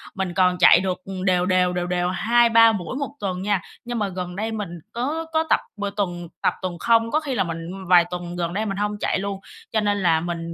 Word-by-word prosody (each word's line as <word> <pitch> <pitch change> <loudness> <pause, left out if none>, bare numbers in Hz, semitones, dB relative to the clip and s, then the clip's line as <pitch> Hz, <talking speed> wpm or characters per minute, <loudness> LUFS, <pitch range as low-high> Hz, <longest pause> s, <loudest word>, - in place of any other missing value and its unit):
mình 190 -3 -2
còn 180 0 +3
chạy 180 - +7
được, 185 -1 -1
ừm, 190 -1 -5
đều 180 -2 +2
đều, 180 -1 +2
đều 175 0 -2
đều 180 0 0
2-3 230 +3 +5
buổi 200 +1 -4
1 280 0 -4
tuần 185 -2 -3
nha, 200 -1 0 0.2
nhưng 240 -1 -3
mà 205 - 0
gần 180 -1 -5
đây, 220 +3 -2
mình 210 -4 -4 0.2
có 290 +8 -2
có 320 0 +3
tập - - +4 0.2
bừa 205 0 -2
tuần 180 -4 -3
tập, - - +2
tuần 185 -2 -4
không, 230 -1 +3
có 305 - +3
khi 285 -4 -4
là - - +2
mình, 165 -2 -4
ưm, 190 - -7
vài 175 -1 +6
tuần 175 -1 -5
gần 170 -1 -2
đây 210 +3 -1
mình 195 -2 -3
hông 210 0 -1
chạy - - 0
luôn. 200 0 -4 0.3
Cho 220 - +1
nên 205 -1 +1
là 165 -2 +4
mình, 170 -1 -4
190 Hz, 250 wpm, -23 LUFS, 180-220 Hz, 0.3 s, chạy